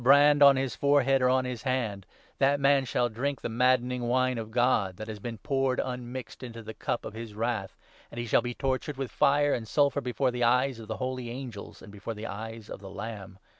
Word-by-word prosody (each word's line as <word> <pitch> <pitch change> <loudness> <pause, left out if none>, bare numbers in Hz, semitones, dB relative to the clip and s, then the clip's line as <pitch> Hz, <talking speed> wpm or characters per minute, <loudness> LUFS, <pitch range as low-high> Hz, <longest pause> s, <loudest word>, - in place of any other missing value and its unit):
513 135 +3 +8
brand 145 0 +5
on 140 -1 +9
his 130 -2 -1
forehead 135 -1 +3
or 125 - +4
on 130 0 +2
his 125 -3 -4
hand, 115 -8 -2 0.3
that 140 +1 +3
man 140 -1 +4
shall 120 0 +1
drink 130 +5 -3
10 - - -31
the - - -6
maddening 125 0 +2
wine 130 0 +1
of 110 -1 -6
God 110 -6 +1
that 110 - -7
has 110 -1 -6
been 115 +2 -6
poured 135 +1 0
unmixed 125 -2 -5
into 115 -3 -8
the 110 +1 -7
cup 120 - -3
of - - -6
his 110 -1 -8
Wrath, 110 -3 -2 0.3
and 120 - -7
he 120 - -2
shall 115 - +3
be 120 -1 -4
tortured 135 +1 -2
with 135 -2 -4
fire 145 +1 +3
and 110 -2 -3
sulphur 140 +3 +2
before 125 +1 0
the 125 0 -2
eyes 125 +1 +2
of 110 - -9
the - - -4
holy 130 -2 -3
angels 120 -4 -8
and 100 - -11
before 105 +3 -6
the 105 +1 -7
eyes 110 +1 -7
of - - -7
the 100 -1 -10
Lamb. 100 -2 -7
125 Hz, 235 wpm, -28 LUFS, 110-130 Hz, 0.3 s, on